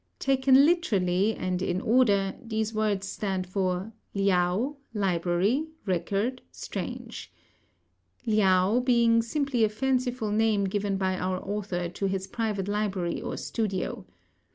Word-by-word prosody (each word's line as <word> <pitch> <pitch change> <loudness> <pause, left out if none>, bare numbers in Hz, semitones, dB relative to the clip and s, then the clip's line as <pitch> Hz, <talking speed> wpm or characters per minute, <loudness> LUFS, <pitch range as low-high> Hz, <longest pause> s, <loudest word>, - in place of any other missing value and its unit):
Taken 270 0 +4
literally 205 - +2
and 185 -1 -2
in 180 -1 0
order, 205 -4 +3
these 220 -1 -2
words 210 -2 0
stand 190 -2 -2
for 185 +2 -2 0.2
"Liao 195 +7 +1 0.2
library 190 - +1 0.2
record 200 +7 -1
strange," - - -6 0.9
"Liao" 200 0 +3
being 235 -2 +4
simply 260 0 0
a 215 - +4
fanciful 250 -1 -1
name 215 -1 +2
given 195 0 -1
by 185 -1 -1
our 185 0 -1
author 195 -3 -2
to 195 +3 -3
his 190 0 -2
private 210 -2 -2
library 205 -4 -1
or - - -4
studio. 195 - -3
205 Hz, 120 wpm, -27 LUFS, 185-230 Hz, 0.9 s, Taken